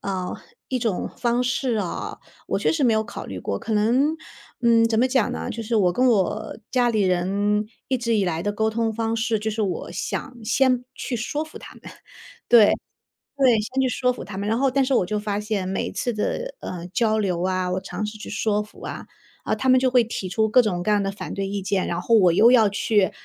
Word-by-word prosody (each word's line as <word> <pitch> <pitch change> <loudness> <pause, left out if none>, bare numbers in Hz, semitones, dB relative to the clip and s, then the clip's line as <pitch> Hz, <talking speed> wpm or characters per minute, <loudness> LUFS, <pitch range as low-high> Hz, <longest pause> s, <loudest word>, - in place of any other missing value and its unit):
嗯， 185 -2 -3 0.3
一 255 - -1
种 225 -6 -2
方 240 0 +1
式 250 -1 0
啊， 195 -5 -3 0.3
我 - - -1
确 - - +1
实 315 -3 -1
没 235 -3 +4
有 220 0 +1
考 - - -8
虑 - - -6
过。 - - -3
可 220 - -3
能， 255 +9 +2 0.5
嗯， 230 -1 +5
怎 220 -1 +1
么 255 - +4
讲 255 -4 +1
呢， - - -4
就 230 0 -5
是 225 +1 -1
我 180 -4 +3
跟 255 +5 +2
我 210 -6 +1
家 245 -2 +2
里 215 -3 +1
人 200 +3 +1 0.2
一 260 -2 +1
直 230 -1 0
以 200 - +2
来 165 -1 -1
的 205 +1 -1
沟 220 +1 0
通 225 0 0
方 225 +1 -1
式 225 -1 0
就 220 +1 -2
是 220 +1 -3
我 195 -4 -2
想 265 -3 -4
先 250 +2 +2
去 250 - -4
说 290 +7 -2
服 315 - -11
他 - - -12
们， - - -17 0.7
对， 230 -3 +8 0.7
对， 265 -3 +5
先 260 +5 -2
去 260 - +2
说 250 +1 +1
服 250 - -7
他 190 0 -8
们。 205 +1 -2
然 225 +2 +1
后 275 - +3
但 270 +1 +2
是 265 +1 0
我 180 - +3
就 210 +3 -2
发 205 -1 -2
现 210 -3 -2
每 190 +1 -2
次 245 - -1
的， - - -3
嗯， 180 0 -7
交 220 -2 +2
流 180 -5 0
啊， 185 -1 0
我 185 - 0
尝 210 - -5
试 215 +1 -6
去 - - -9
说 210 0 0
服 210 - -13
啊， - - -6 0.5
他 260 - 0
们 255 0 +6
就 260 0 +2
会 250 -2 +4
提 210 -4 -5
出 220 +4 +1
各 250 +3 +6
种 180 -6 -2
各 210 - +1
样 205 -1 +3
的 195 - -1
反 200 - -6
对 195 0 -2
意 200 0 -3
见， 195 -1 -1
然 170 +1 -2
后 230 +5 +3
我 180 -5 +5
又 230 +7 +6
要 225 -4 +6
去 205 0 +1
220 Hz, 255 characters per minute, -23 LUFS, 200-245 Hz, 0.7 s, 对